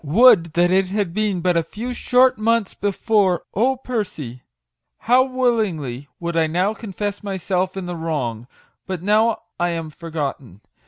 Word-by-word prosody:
Would 170 - +5
that 175 +1 +3
it 190 0 +3
had 195 -2 -2
been 205 -3 0
but 180 0 +2
a 170 - +3
few 225 +9 -6
short 250 -1 +3
months 225 -2 +1
before! 200 -2 +1
Oh, 250 +7 +2
Percy! 190 - -5 0.6
how 250 +3 +4
willingly 210 - -1
would 170 -1 -3
I 165 -1 +3
now 180 +6 +1
confess 205 -2 -5
my 195 -2 -3
self 185 +1 -1
in 190 - -4
the 175 0 -4
wrong! 130 -9 -3 0.4
But 185 -3 -4
now 215 +3 +2 0.2
I 175 0 +1
am 165 -2 -4
forgotten 145 - -5
185 Hz, 160 wpm, -21 LUFS, 165-215 Hz, 0.6 s, Would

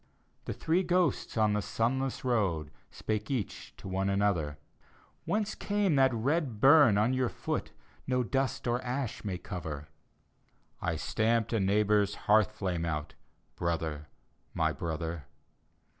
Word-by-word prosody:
The - - -3
three 170 +3 +1
ghosts 180 -7 +1
on 110 -1 +3
the 105 - +1
sunless 130 +6 -1
road, 95 - 0 0.2
Spake 110 0 -3
each 125 -8 -4
to - - -9
one 95 +1 0
another, 100 -7 +1 0.3
" - - -32
Whence 210 0 0
came 205 -5 0
that 135 -1 +5
red 130 0 0
bum 135 -5 +7
on 110 +5 +3
your 130 -2 +1
foot - - -3 0.4
No 125 -1 +2
dust 135 0 -1
or 120 +1 +1
ash 125 -1 -3
may 95 -4 -2
cover?" 80 -6 -6 0.5
" - - -40
I - - 0
stamped 115 +1 0
a 115 - +2
neighbor's 105 +1 +2
hearth 105 0 +5
flame 90 -5 -2
out, 75 -3 -3 0.4
Brother, 80 -3 -2 0.5
my - - +2
brother." 80 -2 -4
105 Hz, 145 wpm, -30 LUFS, 90-130 Hz, 0.5 s, bum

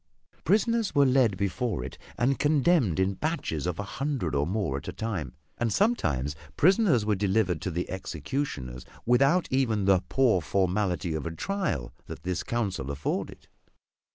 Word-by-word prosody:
Prisoners 215 +1 +2
were 140 -1 +6
led 125 -7 +3
before 100 - -1
it 65 - -7 0.2
and 130 +3 +1
condemned 145 - +3
in 95 +1 +2
batches 130 - -2
of 90 - -2
a 100 - -3
hundred 135 - -2
or 70 +1 +1
more 95 -7 -1
at 70 - -8
a - - -2
time, 95 - -4 0.2
and 115 -2 +1
sometimes 75 - +1 0.2
prisoners 180 - +4
were 105 - +2
delivered 95 -3 +1
to - - -2
the 85 +1 -2
executioners 75 - -4 0.2
without 135 +9 +4
even 115 -7 +1
the 95 -2 +4
poor 120 -9 +3
formality 90 +1 0
of 80 +1 -3
a - - -3
trial 150 - -2
that - - -8
this 90 -1 -1
council 100 - -2
afforded. 70 +1 -3
105 Hz, 155 wpm, -28 LUFS, 85-135 Hz, 0.2 s, were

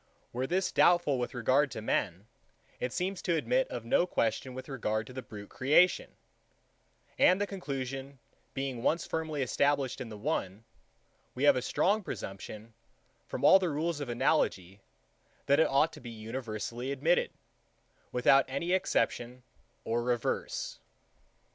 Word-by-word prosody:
Were 125 +2 -2
this 185 +4 0
doubtful 175 -7 +4
with 125 +1 -3
regard 130 +4 +2
to - - -6
men, 100 -3 -1 0.5
it 125 - -2
seems 185 +5 -2
to 170 - 0
admit 250 - +1
of 120 -2 -6
no 170 +9 +3
question 125 -2 -1
with 130 - -7
regard 110 -6 -2
to 125 - -11
the 130 - -5
brute 105 -3 -10
creation; 150 +8 +3 1.0
and 185 +2 +5
the 205 - +1
conclusion 135 -7 -5 0.4
being 135 -3 -3
once 165 +7 +1
firmly 155 -3 -2
established 140 +1 0
in 120 - -6
the 105 - -8
one, 105 - -3 0.7
we 130 - -3
have 145 - +6
a 125 - 0
strong 205 - +1
presumption, 105 - -7 0.5
from - - -3
all 190 - +8
the 185 -2 0
rules 155 +1 -1
of 145 -4 -5
analogy, 100 -5 0 0.6
that 140 +2 +4
it 160 - +4
ought 140 +4 +3
to - - -11
be 120 - -8
universally 115 +2 -5
admitted, 160 +6 +2 0.8
without 135 +2 +4
any 175 0 -2
exception 125 -9 0 0.4
or 115 +1 0
reserve. 120 -1 -1
130 Hz, 150 wpm, -30 LUFS, 115-160 Hz, 1.0 s, all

